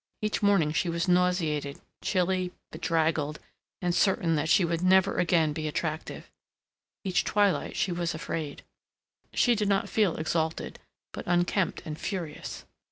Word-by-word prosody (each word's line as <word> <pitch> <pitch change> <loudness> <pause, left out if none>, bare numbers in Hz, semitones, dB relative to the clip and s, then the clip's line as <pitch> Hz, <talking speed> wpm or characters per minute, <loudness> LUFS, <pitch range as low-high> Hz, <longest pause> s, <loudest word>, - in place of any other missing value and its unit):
Each 215 0 -1
morning 200 -7 +3
she 170 +2 0
was 170 +1 -1
nauseated, 175 -6 +1 0.2
chilly, 185 -1 0 0.2
bedraggled, 160 -3 0 0.5
and 175 -1 +1
certain 180 -3 +2
that 155 0 0
she 175 +1 +5
would 170 0 -1
never 190 +1 +4
again 165 -3 +3
be 155 0 -3
attractive; 155 +1 -4 0.7
each 185 -3 +1
twilight 205 -2 +1
she 190 - 0
was 170 -2 -2
afraid. 155 -2 -5 0.7
She 245 - +4
did 210 -2 0
not 195 -1 +1
feel 205 -6 +2
exalted, 160 0 -2 0.3
but - - -7
unkempt 175 +1 +1
and 155 -1 -6
furious. 170 -7 -5
175 Hz, 140 wpm, -28 LUFS, 160-185 Hz, 0.7 s, she